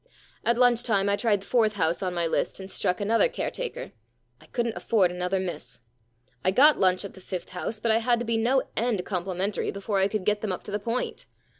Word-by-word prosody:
* - - -31
At 235 0 +3
lunch 245 -1 +4
time 200 -5 +1
I 200 - +3
tried 205 -2 +1
the - - -12
fourth 225 -4 +2
house 170 -4 0
on 180 -2 -2
my 170 -1 0
list 165 - -1
and 190 0 -7
struck 180 - 0
another 225 - +3
caretaker. - - -4 0.5
I - - -17
couldn't 235 -2 -2
afford 195 -6 +2
another 180 +2 -1
miss. 160 -10 -4 0.6
I - - +3
got 280 +10 +5
lunch 185 +1 +2
at 200 - -8
the 190 - -13
fifth 180 -1 -6
house, 185 +4 -4
but 230 +1 +1
I 220 - +4
had 240 +1 +2
to 240 - -3
be 230 0 0
no 250 +4 +2
end 225 -6 0
com 180 -3 -2
plimentary 190 +2 -2
before 200 0 -2
I 190 - +4
could 200 -2 -3
get 210 0 +1
them 215 - -2
up 180 - -4
to - - -7
the 210 - -1
point. 230 +4 -3
205 Hz, 240 wpm, -26 LUFS, 185-230 Hz, 0.6 s, got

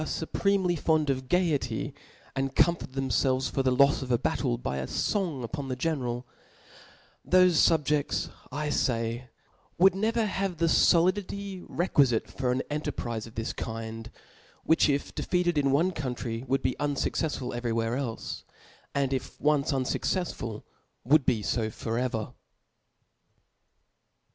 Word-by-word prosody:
Ibprentely 180 +4 0
fond 155 -2 +2
erf 130 -1 -1
gaiety, 145 -7 0 0.4
and 135 0 -2
comfort 170 -6 +2
them 135 -1 -2
ieltrcs 130 +3 +1
fbr 135 - 0
the 130 -1 +2
k)fs 140 +1 +5
of 130 -1 -4
a 120 - +4
battle - - 0
by 65 +2 -3
a 65 -1 -3
fong 170 -11 -1
upon 140 +4 -4
the 130 - -2
ge 145 +6 0
neral 125 -4 -3 1.1
5 - - -16
thofe 175 -3 +5
fubjefts, 145 +1 0 0.2
I 150 +1 -2
fay, 120 -1 -1 0.5
would 190 +1 +6
never 220 +3 +1
have 195 -3 -2
the 165 - +2
foHditf 185 +3 +2
i^quifitc 140 -9 +1
fcM 130 0 0
an 150 +1 -1
cnterprize 120 -7 -4
of 115 - -14
this 115 0 -3
kind, 115 0 -6 0.5
which 160 -1 +4
if 140 0 -1
defeated 175 -2 0
in 140 -1 +2
one 165 +7 +3
country, 125 -6 -4
would 135 +1 0
be 130 - 0
unfuc 145 -1 0
cftfsful 140 -6 -2
evel 120 -1 -2
y 115 0 0
wtiens 120 +4 -1
elfe 120 -5 -4
j - - -18 0.5
and 140 -1 +1
if 130 - -4
once 150 -1 +2
unfucccfsful, 130 - -2 0.4
l^uld'be 130 -6 +4
lb 110 0 -2
tot 115 0 -1
ever. 115 -4 -2
135 Hz, 150 wpm, -28 LUFS, 120-165 Hz, 1.1 s, would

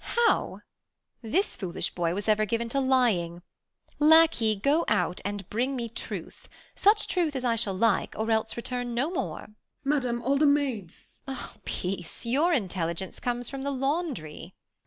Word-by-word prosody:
How - - +1 0.6
1 225 -3 -9
This 390 - +1
foolish 185 -4 -3
boy 175 -1 0
was 205 +2 -4
ever 215 0 +4
given 230 +2 -1
to 275 - 0
lying 220 -11 +2 0.6
Lacquey, 305 -8 +6
go 285 +11 +2
out, 205 -4 +1
and 200 -2 -4
bring 255 +5 0
me 235 -2 -3
truth; 230 - -7 0.2
such 420 +2 +4
truth 335 -6 0
As 255 -1 -2
I 235 -1 +2
shall 210 -4 -1
like, 220 +1 +1
or 220 +1 -1
else 220 +1 0
return 245 0 -3
no 275 +8 0
more. 180 - -3
2. - - -11
Page. 215 - -23 0.3
Madam, 255 -4 0
all 275 +2 +2
the 305 - +5
maids 265 - -1
Beat. 270 -1 -4 0.3
Peace! 180 +2 -4
Your 285 +9 +2
intelligence 185 - -2
comes 245 -1 -2
from 275 -1 -6
the 280 - -2
laundry. 270 - -3
235 Hz, 170 wpm, -27 LUFS, 205-275 Hz, 0.6 s, Lacquey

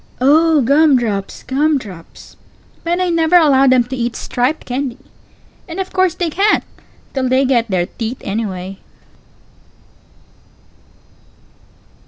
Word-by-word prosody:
Pause. 255 - 0
Oh, 320 -1 +4
gum 285 +2 +4
drops, 205 -5 -3
gum 290 +3 +1
drops! 185 -9 -12 0.5
But 345 +1 -1
I 365 -1 0
never 335 0 +2
allow 275 -5 +4
them 255 -1 +4
to 250 +2 -6
eat 240 -2 -3
striped 250 +6 -2
candy. 255 -1 -3 0.7
And 340 +2 -7
of 380 - -4
course 375 -2 +2
they 345 -3 -2
can't, 405 +6 +2 0.5
till 260 -2 -1
they 260 +1 +3
get 240 -3 +1
their 180 -3 0
teeth, 225 +5 -5
anyway. 195 -2 -4
265 Hz, 130 wpm, -17 LUFS, 235-320 Hz, 0.7 s, Oh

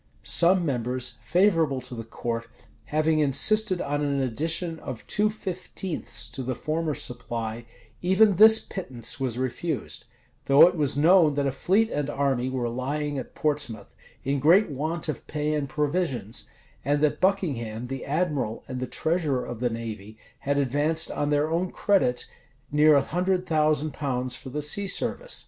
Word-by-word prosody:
Some 180 +1 +4
members, 125 -2 -2
favorable 165 -6 +2
to 125 0 -8
the 115 -1 -6
court, 115 +1 -4 0.4
having 155 +2 +1
insisted 185 +7 +3
on 145 +1 -2
an 140 -1 0
addition 160 +7 -1
of 120 - -8
two 210 +1 +1
fifteenths 185 -3 -3
to 135 - -6
the 130 0 -3
former 155 +3 -2
supply, 115 -1 -4 0.3
even 190 +2 +4
this 220 +2 +9
pittance 130 - -3
was 125 -3 -2
refused;[] 130 +6 -3 0.4
though 140 +3 +8
it 180 - -1
was 145 -4 0
known 160 -1 +5
that 140 -1 0
a 135 - +1
fleet 200 +11 +1
and 145 -1 -2
army 135 -3 0
were 130 -2 -2
lying 140 +4 -3
at 130 - -9
Portsmouth, 145 -9 -2 0.3
in 140 +1 -1
great 170 +6 +4
want 155 +5 -3
of 155 - -5
pay 150 0 -2
and 145 -2 -2
provisions; 145 - -2 0.3
and 145 +2 0
that 150 -1 +1
Buckingham, 130 - -1
the 135 +1 -6
admiral, 145 -7 -2
and 130 -2 -5
the 130 - -3
treasurer 155 -6 -1
of 120 - -7
the 125 0 0
navy, 110 -2 -7 0.2
had 140 +1 -1
advanced 145 +4 +1
on 145 - -2
their 150 +1 +1
own 175 +2 0
credit 155 -12 +1 0.5
near 150 +1 +5
a 140 - +4
hundred 180 +3 -1
thousand 155 -3 +1
pounds 130 -3 -2
for 130 - -10
the 150 +3 -3
sea 200 +7 +1
service. - - -1
145 Hz, 165 wpm, -25 LUFS, 130-170 Hz, 0.5 s, this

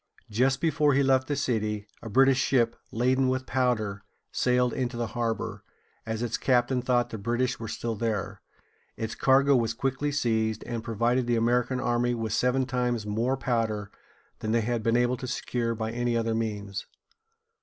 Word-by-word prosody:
Just 130 +5 +2
before 150 -3 +3
he 140 - +4
left 130 -1 +3
the 145 - -1
city, 110 -6 -1 0.2
a 115 - -7
British 135 +3 +4
ship, 120 -4 +2 0.2
laden 130 +3 +2
with 130 0 -1
powder, 120 -6 0 0.3
sailed 125 -1 +2
into 125 -2 -2
the 120 - -1
harbor, 115 -2 -2 0.4
as 110 +1 -2
its 115 -1 -2
captain 125 0 +2
thought 125 -1 +1
the 110 - -5
British 120 +4 -1
were 115 - -5
still 115 +2 -3
there. 110 -3 -2 0.6
Its 110 0 -3
cargo 135 +1 +4
was 115 -2 +1
quickly 135 +3 -1
seized, 110 -5 0
and 115 -2 -4
provided 120 +2 0
the 120 - +2
American 125 +2 +1
army 120 -1 +1
with 110 -2 -3
seven 125 +3 +2
times 125 -3 -1
more 115 +6 0
powder 110 -5 -1 0.5
than 110 0 -2
they 115 - +3
had 120 +1 -1
been 115 +2 +2
able 125 +1 +2
to 130 - -6
secure 115 -2 -2
by 110 0 -3
any 120 0 0
other 115 0 0
means. 105 -3 -3
120 Hz, 175 wpm, -27 LUFS, 115-130 Hz, 0.6 s, he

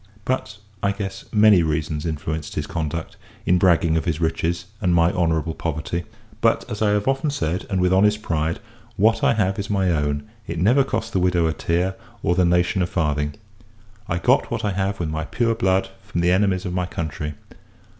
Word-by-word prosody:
But, 125 -4 -2 0.2
I 100 0 +1
guess, 100 -1 -6
many 105 -3 +6
reasons 75 0 -1
influenced 80 -1 -4
his 75 - -2
conduct, 80 0 -4 0.3
in 90 0 +3
bragging 85 -3 +3
of 80 - -1
his 80 -3 -1
riches, 85 +1 -1 0.2
and 90 -2 +2
my 85 0 +4
honourable 80 -2 0
poverty; 80 +2 -3 0.4
but, - - +2
as 105 - -4
I 105 - +3
have 105 +2 +1
often 135 +3 +1
said, 90 - -2
and 95 -2 0
with 90 0 +3
honest 105 +2 +3
pride, 80 0 -1 0.4
what 110 +3 +3
I - - +4
have 95 -2 0
is 100 - -4
my 95 -3 +2
own; 75 -2 0 0.2
it 85 - -4
never 120 - +4
cost 115 -3 -3
the 95 - +2
widow 90 -2 +2
a 80 - +1
tear, 90 +4 0 0.3
or 85 - +2
the 90 0 +3
nation 90 +2 +2
a 90 - +1
farthing. 75 -4 -1 0.7
I 85 - -1
got 125 +9 +2
what 115 -2 -2
I 105 - +1
have 95 +1 -1
with 85 -3 -2
my 80 +1 -3
pure 115 +5 0
blood, 95 -3 +1
from 85 - -3
the 90 +1 +3
enemies 95 0 +2
of 90 - -3
my 90 -1 -1
country. 75 -3 -4
90 Hz, 200 wpm, -22 LUFS, 80-100 Hz, 0.7 s, many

